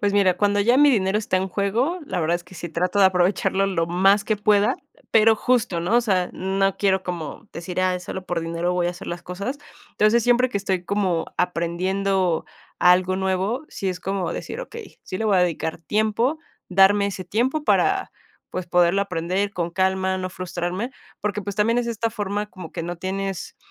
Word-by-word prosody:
pues, 205 -1 +1
mira, 190 -3 +3
cuando 205 +1 +2
ya 240 +5 +4
mi 290 +1 +6
dinero 200 -4 +2
está 205 -3 0
en 190 +1 -1
juego, 230 - 0
la 175 - -2
verdad 165 +2 +1
es 175 - -13
que 180 - -15
sí 170 0 -6
trato 180 +5 -1
de 195 - +7
aprovecharlo 190 +1 +2
lo 165 -4 0
más 195 +4 +3
que 215 -1 0
pueda, 210 0 +3 0.2
eh, - - -26
pero, 225 0 +6
justo, 220 -7 +1
¿no?, 185 +8 +2
o - - +5
sea, 190 -6 0
no 195 +1 0
quiero 190 -2 +2
como 175 +3 -6
decir: 175 +2 -4
"Ah, 185 -1 +1
solo 185 +1 -6
por 175 -1 -1
dinero 170 +2 -2
voy 175 -1 +1
a - - +1
hacer 180 +2 -10
las 175 0 -5
cosas". 200 +11 -5 0.3
Entonces, 215 +2 +3
siempre 245 +2 +3
que 200 - -1
estoy 190 -2 -2
como 185 -4 0
aprendiendo 180 +1 0 0.3
algo 180 +1 +4
nuevo, 190 +8 -1
sí 195 - -4
es 180 -1 -3
como 190 -1 -2
decir: 485 - -5
"Okey, 460 -3 -10
sí 185 - -5
le 225 - -2
voy 205 -3 +3
a - - +4
dedicar 165 -2 -1
tiempo, 220 - 0 0.3
darme 195 +2 +5
ese 190 -2 -5
tiempo 255 - 0
para, - - +2 0.4
pues, 185 -1 -4
poderlo 175 +2 +3
aprender 185 +2 -2
con 170 -3 -2
calma, 190 +1 0
no 185 0 -3
frustrarme". 185 +5 -4 0.3
Porque, 210 0 -2
pues, 200 0 -5
también 225 +3 +2
es 240 - -1
esta 230 0 -1
forma 205 -1 -3
como 180 -5 -10
que - - -4
no 175 +1 -4
tienes 190 +1 -4
190 Hz, 205 wpm, -23 LUFS, 180-210 Hz, 0.4 s, de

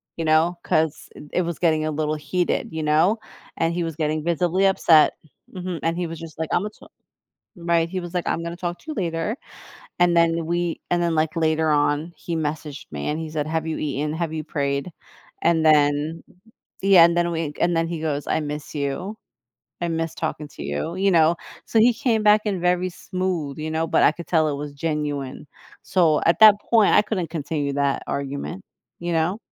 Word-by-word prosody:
you 165 - -3
know, 160 +3 +3
'cause 155 -1 0
it - - -10
it - - +2
was 170 -2 -4
getting 155 -3 +2
a 155 - -1
little 155 0 -1
heated, 155 +4 -1
you 160 -1 -3
know, 155 +8 +3 0.4
and 165 +1 +1
he 175 0 -1
was 165 -2 -4
getting 155 -1 -1
visibly 175 +3 +1
upset 165 -5 +5 0.4
mhm, 180 -2 -4
and 165 +1 0
he 175 -1 -1
was 165 -1 -7
just 165 -2 -10
,like, 160 -2 -2
"Imma 205 +4 +1
ta" 215 - -18 0.7
right, 170 -1 +1
he 185 +1 -3
was, 175 -1 -7
like, 180 -1 -2
"I'm 165 - -1
gonna 170 0 -5
talk 175 0 -3
to - - -22
you - - -2
later," 170 - -2 0.6
and 175 -1 +4
then 165 -1 +3
we 170 0 -1
and 175 0 +1
then, 170 -1 0
like, 155 0 0
later 160 -1 +1
on 150 +2 +1
he 170 - -4
messaged 150 -2 -4
me 70 -1 -4
and 150 - -2
he 160 -1 -5
said, 155 -1 -2
"Have 160 0 -2
you 160 - -2
eaten? 150 +1 -2
Have 165 0 -2
you 155 -1 -3
prayed?" 140 +2 -2 0.5
And 165 -1 +3
then 150 +1 +3 0.6
yeah, 190 -3 +7
and 170 0 +1
then 175 0 +2
we 160 -3 -2
and 175 0 +2
then 165 0 +1
he 170 -1 -4
goes, 145 -2 -2
"I - - +1
miss 150 -1 -6
you, 145 +9 -3 0.6
I 175 - -1
miss 165 -1 -2
talking 150 -1 -4
to - - -10
you," 75 - -3
you 195 +1 +2
know? 165 -1 +5 0.3
So, 225 - +1
he 240 +2 +5
came 225 -1 +1
back 210 0 +6
in 195 -4 -1
very 180 +1 +1
smooth, 180 -6 -3
you 155 +1 -4
know, 160 +1 0
but - - +2
I - - +5
could 170 - -9
tell 160 -3 +3
it 145 - -2
was 145 0 -6
genuine. 145 -3 -3 0.4
So, 165 -5 +2
at 170 - +3
that 215 -2 +9
point, 225 -3 +5
I - - +7
couldn't 185 -6 -3
continue 150 -3 -2
that 140 -1 0
argument, 140 +7 -4 0.4
you 175 0 -2
know? 165 +5 +1
165 Hz, 210 wpm, -23 LUFS, 150-175 Hz, 0.7 s, that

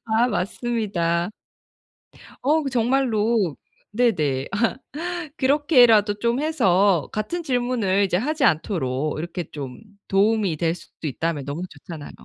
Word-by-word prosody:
아 225 +1 +2
맞습니다. 195 -6 -1 1.1
어 305 +4 +2
그 275 - -2
정말로 230 - +1 0.3
네네. 160 - +1
아. 200 - -2 0.8
그렇게라도 250 -7 +4
좀 235 +2 +1
해서 195 - +2
같은 215 +12 -3
질문을 245 - +1
이제 190 -2 +1
하지 290 - 0
않도록 155 - 0
이렇게 175 +2 -4
좀 135 -4 -7 0.3
도움이 200 -3 +2
될 165 +2 0
수도 170 - -10
있다면 155 +1 -2
너무 145 +5 -4
좋잖아요. 150 0 -10
205 Hz, 255 characters per minute, -23 LUFS, 170-245 Hz, 1.1 s, 그렇게라도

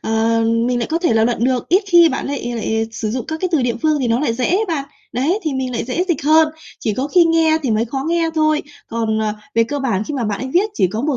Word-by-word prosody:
ờ, 225 +1 +1 0.3
mình 245 -1 0
lại 235 - -1
có 330 - +1
thể 340 -9 +1
là 220 0 +3
luận 235 0 0
được, 255 -2 0
ít 375 +4 +4
khi 345 -2 +7
bạn 265 - -3
lại 270 -4 -3
lại 220 0 -1
sử 215 -2 -3
dụng 250 +1 -3
các 315 0 -5
cái 370 - 0
từ 290 -6 +2
địa 240 -1 0
phương 310 -1 +2
thì 245 - 0
nó 235 +3 +1
lại 265 -6 0
dễ 250 - -2
ấy 400 +5 +2
bạn. 290 -5 -1 0.3
Đấy, 290 - 0
thì 310 -3 -2
mình 260 -1 -2
lại 230 - -2
dễ 345 +9 -1
dịch 315 -5 0
hơn, 315 +1 +5 0.3
chỉ 215 - -1
có 270 +5 -2
khi 345 +2 +5
nghe 325 -1 +3
thì 255 - -1
mới 220 +1 +1
khó 270 +3 -4
nghe 335 -1 +1
thôi. 310 -1 +2 0.3
Còn, 225 -1 -1
ờ, 215 -1 0 0.2
về 230 0 +4
cơ 285 +4 -4
bản 225 -7 -1
khi 295 - -5
mà 245 -4 -2
bạn 205 -1 -2
ấy 260 - -4
viết 415 +4 +3
chỉ 185 - +2
có 215 +5 -4
một 290 -3 0
265 Hz, 295 wpm, -18 LUFS, 230-315 Hz, 0.3 s, khi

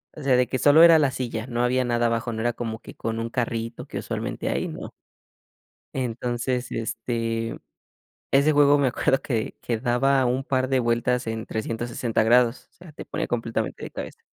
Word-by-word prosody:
o 155 - -9
sea, 130 -2 +4
de 125 -2 +3
que 130 - -2
solo 150 +3 +6
era 165 -1 +9
la 145 -3 +2
silla, 120 -3 -4
no 120 -2 -2
había 125 +1 +2
nada 120 -1 +1
abajo, 115 0 0
no 110 - -4
era 120 +1 0
como 110 -2 -5
que - - -12
con 115 0 -3
un 115 0 -3
carrito 115 -1 -3
que - - -5
usualmente - - -4
hay, - - -1
no. - - -7 1.0
Entonces, 125 0 -2
este, 115 0 -3 0.7
ese 140 +3 +4
juego 145 0 +5
me 135 - +3
acuerdo 135 +2 +1
que, 115 -6 -2
que 115 -2 -1
daba 130 +2 +2
un 125 +2 0
par 130 -1 0
de 130 -1 +2
vueltas 120 +1 0
en 110 0 -3
360 115 +1 -2
grados, 120 +1 +3
o - - -40
sea, 175 -3 -14
te - - -9
pone - - -3
completamente 115 -1 -3
de - - -6
cabeza. - - -7
120 Hz, 195 wpm, -24 LUFS, 115-130 Hz, 1.0 s, era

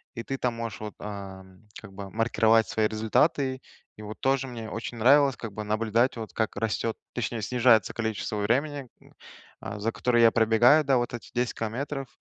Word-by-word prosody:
и 115 - -5
ты 135 - -4
там 125 -2 -1
можешь 115 -2 -5
вот, 105 -1 -6
а, 100 -2 -7 0.4
как 100 -3 -13
бы 95 0 -8
маркировать 115 0 +3
свои 110 -1 +1
результаты. 130 +5 +1 0.4
И - - -10
вот 105 +1 -8
тоже 135 0 +1
мне 115 -3 -7
очень 115 +2 -6
нравилось, 135 +3 +5
как 115 -3 -7
бы, 105 - -5
наблюдать, 110 +3 +1
вот, 110 -1 -7
как 110 -2 -1
растет, 115 0 -2 0.2
точнее, 120 -1 -3
снижается 120 -1 +3
количество 110 -2 -3
времени, 135 +6 -1
э, - - -21 0.6
а, 105 +1 -6
за 110 +3 -1
которое 120 0 +1
я 115 - +7
пробегаю, 115 +7 +5
да, 135 -2 +3
вот 120 0 -2
эти 120 - -8
10 120 0 -1
километров, 135 +5 -4
115 Hz, 185 wpm, -27 LUFS, 110-125 Hz, 0.6 s, я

